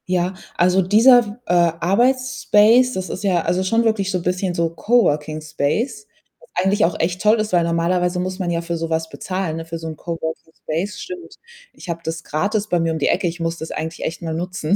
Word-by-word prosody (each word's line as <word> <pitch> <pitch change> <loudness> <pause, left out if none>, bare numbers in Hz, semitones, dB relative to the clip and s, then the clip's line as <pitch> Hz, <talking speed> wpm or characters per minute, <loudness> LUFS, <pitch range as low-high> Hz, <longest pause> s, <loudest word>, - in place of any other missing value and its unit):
Ja, 180 0 0 0.2
also, 180 +2 +4
dieser 225 +7 +6
w 210 +3 -9
äh, - - 0 0.3
Arbeits 255 +7 +1
space, 235 +5 +5
das 185 0 -4
ist 190 - -5
ja 185 -4 +2
also, 185 +1 0
schon 225 +5 +2
wirklich 205 -4 +1
so 180 -2 -1
bisschen 180 +1 -1
so 170 -1 +1
Coworking 155 -6 +1
Space, 210 - -2 0.3
was - - -21 0.2
eigentlich 200 0 +3
auch 170 - -2
echt 180 +3 -1
toll 215 +1 +4
ist, 215 -2 -2
weil 175 -1 +4
normalerweise, 175 +2 0
muss 185 +1 -3
man 180 -2 -1
ja 170 -1 0
für 170 0 -3
so 165 0 -3
was 160 0 -1
bezahlen, 185 -4 -3
ne? 165 - -6
Für 165 0 -5
so 165 0 -7
'n 160 - -5
Coworking 160 0 -5
Space, 195 +7 -3
stimmt. 360 - -8 0.4
Ich - - -13
habe 170 0 -3
das 165 0 -4
gratis 205 +7 -1
bei 175 -4 +1
mir 165 0 +1
um - - -2
die - - +1
Ecke, 180 +1 +1
ich 170 +1 -4
muss 165 0 -2
das 160 - -6
eigentlich 160 +1 -5
echt 165 - -4
mal 165 -1 -3
nutzen. 180 +1 -1
180 Hz, 230 wpm, -20 LUFS, 165-205 Hz, 0.4 s, dieser